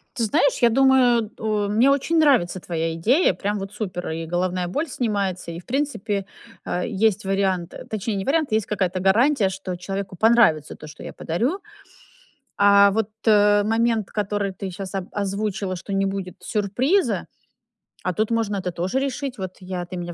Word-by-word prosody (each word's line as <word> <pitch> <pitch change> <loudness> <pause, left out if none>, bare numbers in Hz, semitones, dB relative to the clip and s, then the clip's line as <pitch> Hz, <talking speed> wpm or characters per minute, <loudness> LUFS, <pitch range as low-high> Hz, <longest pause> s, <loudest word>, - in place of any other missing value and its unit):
Ты 235 - -1
знаешь, 250 +6 +2
я 240 - +6
думаю, 245 -3 +4
у 215 -2 -1
мне 225 +6 +4
очень 280 +4 +1
нравится 255 - +3
твоя 165 -2 -2
идея, 245 - +3
прям 205 +1 -2
вот 195 0 -6
супер. 180 -4 -4
И 165 +1 -4
головная 180 +1 -1
боль 290 - -2
снимается, 200 - -2
и, 165 - -7
в 175 - -16
принципе, 230 -8 -2 0.4
а, 180 - -2
есть 215 -2 0
вариант 190 -3 0 0.2
точнее, 215 0 -2
не 195 -1 -3
вариант, 300 -2 +1
есть 215 -2 +1
какая-то 185 -3 -1
гарантия, 210 +4 +3
что 190 -1 -5
человеку 195 +1 -5
понравится 220 -10 +3
то, 155 - -11
что 150 - -11
я - - -7
подарю. 240 - -1 1.0
А 200 0 +6
вот, 220 0 0 0.2
э, 205 -1 +5
момент, 225 -1 +1
который 205 -1 -2
ты 190 +1 -6
щас, 190 +1 -7
о 190 -2 -3
озвучила, 200 -1 -2
что 180 - -7
не 195 0 +1
будет 195 -2 -4
сюрприза, 245 - 0 0.8
а 185 - -1
тут 215 +4 -1
можно 225 -3 0
это 185 -2 -3
тоже 180 +9 -1
решить. 275 -1 -3
Вот 185 -2 -6
я 180 -1 -5
ты 180 - -8
меня 175 -1 -5
200 Hz, 175 wpm, -23 LUFS, 185-230 Hz, 1.0 s, я